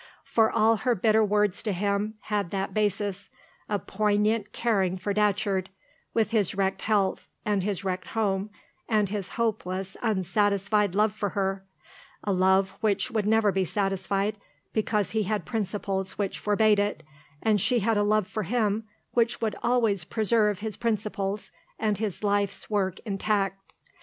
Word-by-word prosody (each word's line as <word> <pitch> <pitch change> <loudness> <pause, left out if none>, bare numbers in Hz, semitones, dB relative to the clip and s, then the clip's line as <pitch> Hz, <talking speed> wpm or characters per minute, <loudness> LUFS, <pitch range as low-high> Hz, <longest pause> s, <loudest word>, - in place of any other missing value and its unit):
For 225 -1 +3
all 225 +1 +3
her 245 +3 +1
bitter 220 +2 +3
words 210 -2 +1
to 215 - -1
him 200 +3 -1
had 205 -4 -1
that 195 +1 -3
basis 205 -1 -1 0.4
a 205 - +1
poignant 210 +2 0
caring 195 -6 +1
for 200 +2 -2
Datcherd, 200 -2 +1 0.4
with 220 -1 +1
his 210 -4 +1
wrecked 190 -1 0
health, 205 -3 +1 0.2
and 205 -2 +1
his 200 0 -2
wrecked 185 -1 -3
home, 205 -2 -1 0.4
and 210 -3 +2
his 200 -2 -3
hopeless, 195 -4 -2
unsatisfied 205 -1 +1
love 210 0 +3
for 205 -1 -2
her 195 0 -1 0.6
a 200 - 0
love 190 +1 +3
which 215 +3 +1
would 215 -3 0
never 220 -1 +4
be 190 0 +1
satisfied, 195 +2 -1 0.4
because 215 -2 0
he 220 - +1
had 210 +1 -1
principles 195 -3 -2
which 200 -2 -2
forbade 210 0 +3
it, 205 -5 -1 0.4
and 215 -3 +3
she 245 +1 +2
had 225 +2 +2
a 205 - +3
love 210 0 +2
for 215 - -4
him 215 +1 0 0.3
which 235 0 +1
would 220 -3 -1
always 225 -7 +2
preserve 210 0 +1
his 215 -2 -4
principles 210 -3 -2 0.3
and 210 -2 0
his 215 -2 -3
life's 205 0 0
work 190 -3 0
intact. 195 -2 -1
205 Hz, 155 wpm, -27 LUFS, 195-215 Hz, 0.6 s, never